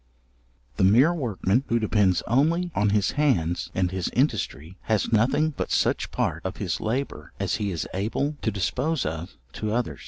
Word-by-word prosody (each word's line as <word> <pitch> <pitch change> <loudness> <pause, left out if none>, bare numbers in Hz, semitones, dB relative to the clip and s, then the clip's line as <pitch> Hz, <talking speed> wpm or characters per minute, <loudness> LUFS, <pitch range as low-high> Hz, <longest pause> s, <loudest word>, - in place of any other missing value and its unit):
The - - +2
mere 120 - +5
workman, 120 - 0
who 115 - +2
depends 105 -4 +2
only 165 +8 +2
on 105 0 +2
his 105 -1 +2
hands 115 - +1
and 90 -1 +1
his 95 -2 -2
industry, 95 - -1
has 110 +1 +1
nothing 130 +8 +3
but - - -4
such - - +1
part 80 +2 -2
of 95 0 -4
his 90 -5 -2
labour 125 +6 -3
as - - 0
he 105 - -2
is 85 -4 -3
able 115 +10 -1
to - - 0
dispose 130 - -1
of 80 +4 -5 0.2
to 110 -1 -3
others. 120 +2 -1
110 Hz, 175 wpm, -25 LUFS, 95-135 Hz, 0.2 s, mere